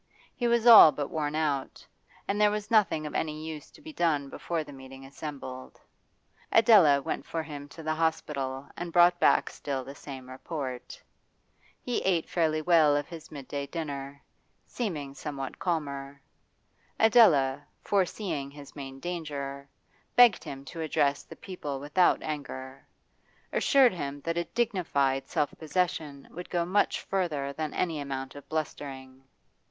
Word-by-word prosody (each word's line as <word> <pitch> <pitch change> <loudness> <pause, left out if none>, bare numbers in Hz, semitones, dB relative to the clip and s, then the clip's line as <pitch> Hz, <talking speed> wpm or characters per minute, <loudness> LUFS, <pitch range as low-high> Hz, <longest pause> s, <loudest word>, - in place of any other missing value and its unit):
He 240 - 0
was 235 -1 +2
all 225 -9 +11
but 145 0 -4
worn 150 -2 -2
out, 145 -4 -2 0.4
and 205 +1 0
there 210 - +6
was 210 +1 -4
nothing 200 -8 +3
of 150 - -6
any 155 0 -2
use 155 -2 -7
to - - -18
be 315 0 -9
done 150 - 0
before 165 +3 -3
the 145 - -12
meeting 135 0 -11
assembled. 135 -2 -8 0.7
Adela 190 -12 +6
went - - -3
for 165 +2 -4
him 145 -2 -8
to 160 +3 -11
the 155 0 0
hospital 140 -4 -2
and 175 0 -5
brought 175 0 +5
back - - +3
still 135 -2 -4
the 135 +2 -9
same 135 -2 -9
report. 130 -1 -6 0.8
He 245 - -2
ate 175 -4 +1
fairly 155 -2 0
well 155 -3 +5
of 145 - -3
his 165 -3 -10
midday 140 -1 -5
dinner, 140 -3 -6 0.4
seeming 155 - -4
somewhat 140 -2 -6
calmer. 140 -5 -3 0.8
Adela, 150 - +5 0.2
foreseeing 185 -7 -1
his 140 0 -13
main 135 -2 -8
danger, 140 -5 -5 0.5
begged 245 -5 +6
him 135 0 -8
to 165 +3 -7
address 145 -3 +1
the - - -13
people 150 -8 -6
without 150 +6 +2
anger, 135 -3 -6 0.7
assured 270 -5 +5
him 145 -4 -5
that 165 +2 -2
a 170 0 -1
dignified 140 - 0
self 145 - 0
possession 155 -4 -2
would 180 +2 -8
go 175 -1 0
much 195 +4 +1
farther 155 -8 -2
than 155 0 -3
any 165 -4 -1
amount 135 -2 -5
of 145 - -12
blustering. 135 -4 -5
150 Hz, 150 wpm, -28 LUFS, 140-175 Hz, 0.8 s, all